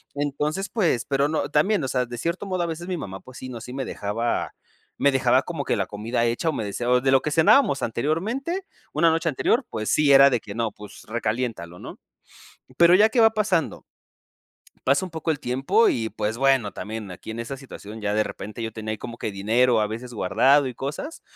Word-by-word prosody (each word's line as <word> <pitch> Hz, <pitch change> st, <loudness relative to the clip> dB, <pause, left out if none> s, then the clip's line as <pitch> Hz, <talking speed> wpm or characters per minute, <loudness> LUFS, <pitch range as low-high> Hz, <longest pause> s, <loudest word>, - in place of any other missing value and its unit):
Entonces, 150 Hz, +6 st, -2 dB
pues 170 Hz, -, +1 dB
pero, 140 Hz, +1 st, +1 dB
no, 155 Hz, -, -1 dB
también, 160 Hz, +3 st, +2 dB
o -, -, -1 dB
sea, 125 Hz, -1 st, 0 dB
de 120 Hz, 0 st, -8 dB
cierto 170 Hz, +7 st, -2 dB
modo, 185 Hz, -2 st, -1 dB
a -, -, -1 dB
veces 170 Hz, +2 st, -5 dB
mi 180 Hz, -2 st, -2 dB
mamá, 95 Hz, -8 st, -6 dB
pues, 130 Hz, 0 st, -12 dB
sí, 130 Hz, -, -7 dB
¿no?, 120 Hz, -3 st, -7 dB
sí 125 Hz, -, -9 dB
me 135 Hz, -1 st, -3 dB
dejaba 115 Hz, +4 st, -2 dB, 0.5 s
me 140 Hz, -, +4 dB
dejaba 130 Hz, -1 st, +3 dB
como 165 Hz, -5 st, -4 dB
que -, -, +1 dB
la -, -, -1 dB
comida 115 Hz, +3 st, -2 dB
hecha 120 Hz, +8 st, 0 dB
o -, -, -1 dB
me 110 Hz, -, -3 dB
decía 120 Hz, +4 st, -4 dB
o 125 Hz, 0 st, +4 dB
de 135 Hz, -, +1 dB
lo 135 Hz, -1 st, +5 dB
que 150 Hz, -, -2 dB
cenábamos 160 Hz, -, +4 dB
anteriormente, 215 Hz, -, -2 dB, 0.3 s
una 165 Hz, +2 st, +4 dB
noche 165 Hz, +1 st, 0 dB
anterior, 230 Hz, -, +1 dB
pues, 110 Hz, -1 st, -3 dB
sí, 150 Hz, -2 st, +4 dB
era 140 Hz, +1 st, +8 dB
de 125 Hz, -3 st, +1 dB
que 100 Hz, -, -8 dB
no, 115 Hz, -2 st, -1 dB
pues, 105 Hz, 0 st, -12 dB
recaliéntalo, 110 Hz, -6 st, -3 dB
¿no? -, -, -10 dB, 0.8 s
Pero, 170 Hz, +1 st, +7 dB
ya, 210 Hz, +3 st, +6 dB
¿qué 245 Hz, -, -2 dB
va 225 Hz, 0 st, +7 dB
pasando? 200 Hz, -7 st, 0 dB, 1.1 s
Pasa 140 Hz, +8 st, +3 dB
un 180 Hz, -, -10 dB
poco 160 Hz, 0 st, -4 dB
el 150 Hz, -3 st, 0 dB
tiempo 135 Hz, -, +2 dB
y, 110 Hz, -2 st, -1 dB
pues, 110 Hz, +2 st, -3 dB
bueno, 135 Hz, -6 st, +3 dB
también 110 Hz, -2 st, -6 dB
aquí 90 Hz, -, -10 dB
en 110 Hz, +1 st, -5 dB
esa 115 Hz, +4 st, -4 dB
situación, 110 Hz, -5 st, -10 dB
ya, 105 Hz, 0 st, -1 dB
de 110 Hz, -, +3 dB
repente, 105 Hz, +4 st, -7 dB
yo 110 Hz, -, -3 dB
tenía 110 Hz, 0 st, -7 dB
ahí 110 Hz, -, -3 dB
como 120 Hz, -1 st, -8 dB
que 105 Hz, -, -3 dB
dinero, 110 Hz, +5 st, +2 dB
a 105 Hz, -, +2 dB
veces 115 Hz, +4 st, -6 dB
guardado 135 Hz, +7 st, +3 dB
y 125 Hz, -, -4 dB
cosas, 150 Hz, -, -6 dB
130 Hz, 225 wpm, -24 LUFS, 115-160 Hz, 1.1 s, era